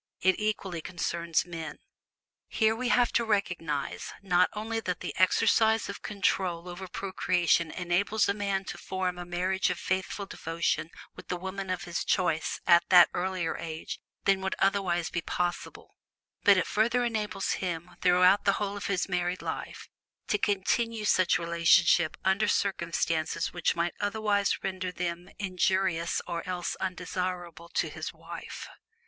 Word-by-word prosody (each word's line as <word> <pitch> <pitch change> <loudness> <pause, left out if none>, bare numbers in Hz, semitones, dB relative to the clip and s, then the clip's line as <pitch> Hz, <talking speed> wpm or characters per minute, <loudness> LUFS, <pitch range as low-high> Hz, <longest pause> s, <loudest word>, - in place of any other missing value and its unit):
It 190 0 +3
equally 195 -5 -2
concerns 170 -1 -1
men. 165 -2 -6 0.7
Here 220 -1 +2
we 245 +1 -2
have 245 -1 +3
to 235 - +3
recognize, 175 -9 -2
not 180 -1 +3
only 225 +2 -3
that 180 -5 -3
the - - -4
exercise 220 +4 +3
of 200 - -6
control 185 -4 -1
over 180 +2 -7
procreation 180 -3 +1
enables 180 +6 +1
a 200 - +2
man 200 -1 -1
to - - -6
form 185 -1 -3
a 175 - -5
marriage 185 +2 0
of 180 - -2
faithful 190 +2 -2
devotion 165 -3 -2 0.3
with - - -12
the 180 - -2
woman 190 +1 -5
of 185 -1 -2
his 170 0 -3
choice 165 -4 0
at 170 -1 +6
an 180 -2 +9
earlier 180 -2 -1
age 160 -1 -6 0.3
than 195 -1 +3
would 190 0 -1
otherwise 190 -4 +1
be 170 - -1
possible, 175 +1 -3 0.5
but 200 -2 +7
it 185 - +2
further 235 +3 +2
enables 210 -4 -1
him, 175 -1 -3
throughout 180 +2 +5
the 200 - +4
whole 205 0 -2
of 205 - -4
his 195 -3 0
married 180 -1 -1
life, - - -5 0.4
to 210 - +2
continue 210 +3 0
such 185 -3 +4
relationship 170 0 +3
under 190 +2 +3
circumstances 170 -4 0
which 175 - +1
might 170 0 0
otherwise 205 -1 0
render 185 -1 -3
them 175 0 -4
injurious 185 -3 0
or 170 -1 -3
else 175 -1 -2
undesirable 180 -2 -4
to - - 0
his - - -5
wife. - - -8
185 Hz, 150 wpm, -29 LUFS, 175-200 Hz, 0.7 s, an